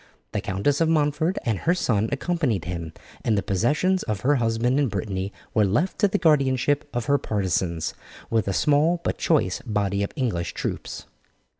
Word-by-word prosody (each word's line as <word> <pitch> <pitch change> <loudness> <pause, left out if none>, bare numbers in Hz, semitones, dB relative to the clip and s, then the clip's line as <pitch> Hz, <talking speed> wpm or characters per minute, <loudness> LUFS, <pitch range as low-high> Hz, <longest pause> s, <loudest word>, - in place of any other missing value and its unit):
The - - -2
Countess 135 - 0
of 165 - +3
Montford 155 +3 +1
and 110 -5 0
her 175 - +2
son 110 - +1
accompanied 140 - -1
him, 85 -2 -4 0.3
and 110 -2 +2
the 100 - 0
possessions 150 - +1
of 105 -4 -3
her 145 +2 +3
husband 120 +3 +1
in 145 - +2
Brittany 100 -2 -3 0.2
were 110 -3 +4
left 120 - 0
to 205 - +5
the 195 - 0
guardianship 145 -2 +2
of 120 -2 -2
her 140 +2 +3
partisans, 90 -5 -1 0.3
with 110 -3 0
a - - +1
small 150 - +3
but - - -2
choice 140 - +1
body 100 -4 -1
of 100 - -2
English 115 - -2
troops. - - -4
120 Hz, 175 wpm, -24 LUFS, 100-150 Hz, 0.3 s, to